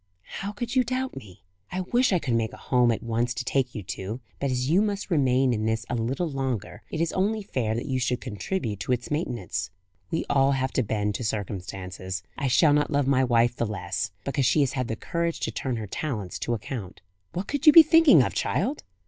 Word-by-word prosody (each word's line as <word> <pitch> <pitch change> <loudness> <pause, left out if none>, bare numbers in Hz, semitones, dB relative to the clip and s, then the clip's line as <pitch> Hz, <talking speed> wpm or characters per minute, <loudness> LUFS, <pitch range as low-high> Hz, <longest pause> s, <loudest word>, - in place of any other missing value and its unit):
"How 195 +2 -3
could 235 +4 -5
you 255 - +5
doubt 255 +2 -2
me? 95 -10 -11 0.3
I 185 - -2
wish 245 +7 +2
I 185 - +4
could 135 -7 -2
make 115 -1 0
a - - -9
home 125 -2 +2
at 115 - -3
once 115 +1 -1
to 125 - -4
take 130 -2 0
you 105 - -4
to; 95 +5 -5 0.2
but 140 - 0
as 125 0 -1
you 175 +7 +4
must 205 -2 -2
remain 130 -4 +3
in 110 -1 -1
this 110 +1 -1
a - - 0
little 125 +9 -1
longer, 130 -7 -3
it - - -4
is 165 0 0
only 210 +3 0
fair 115 - -1
that 115 - -3
you 130 -2 -1
should 125 0 0
contribute 110 - -3
to 125 - 0
its 125 +3 -4
maintenance. 120 - -2 0.4
We 165 - -1
all 135 0 +3
have 130 0 -1
to - - +2
bend 105 -2 -1
to 110 - -4
circumstances. 95 -3 -4
I 140 - -1
shall 145 +4 +5
not 150 0 +2
love 145 -2 +1
my 130 -1 +3
wife 120 -1 +3
the 120 - -1
less, 95 0 -3 0.2
because 140 -1 +1
she 155 - +4
has 135 -2 +1
had 130 -2 -1
the 110 - -2
courage 170 +7 -2
to - - -1
turn 130 -2 -3
her 110 -2 -4
talents 105 - -4
to 120 - -1
account. 105 -4 -7 0.3
What 180 +3 -3
could 285 +2 -2
you - - +12
be 330 +1 +11
thinking 315 - +6
of, - - -2
child?" 220 - -1
130 Hz, 230 wpm, -26 LUFS, 110-160 Hz, 0.4 s, you